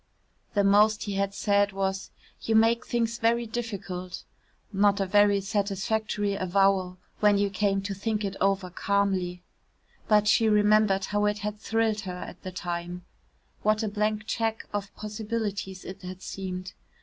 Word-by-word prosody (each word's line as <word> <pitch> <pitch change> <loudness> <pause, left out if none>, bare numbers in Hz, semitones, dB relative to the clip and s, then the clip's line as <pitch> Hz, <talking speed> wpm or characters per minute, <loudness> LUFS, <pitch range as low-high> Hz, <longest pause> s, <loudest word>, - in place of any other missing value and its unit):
The 200 - +4
most 210 +2 +4
he 205 - -4
had 195 0 -1
said 200 -1 +2
was 195 0 -2 0.3
"you 225 - 0
make 225 +2 +3
things 235 -1 -1
very 235 +1 +2
difficult," 195 -6 -5 0.5
not 200 +1 +3
a 195 - +1
very 205 +1 +4
satisfactory 205 +1 -1
avowal 190 -1 +1 0.2
when 205 -1 +4
you 200 0 +1
came 195 0 0
to 200 0 -3
think 210 +1 -2
it 195 -1 -3
over 195 -2 +1
calmly. 185 -2 0 0.6
But 210 -1 +4
she 220 +1 +4
remembered 210 -2 +4
how 205 0 0
it 210 0 +1
had 210 0 -3
thrilled 225 0 0
her 180 -3 -6
at - - -11
the 185 - -6
time 175 0 -5 0.6
what 215 +1 +2
a - - 0
blank 210 +1 -1
cheque 225 0 -2
of 200 -1 -3
possibilities 210 -3 -4
it 185 - -8
had 185 +1 -8
seemed. 185 -1 -5
200 Hz, 155 wpm, -27 LUFS, 195-215 Hz, 0.6 s, The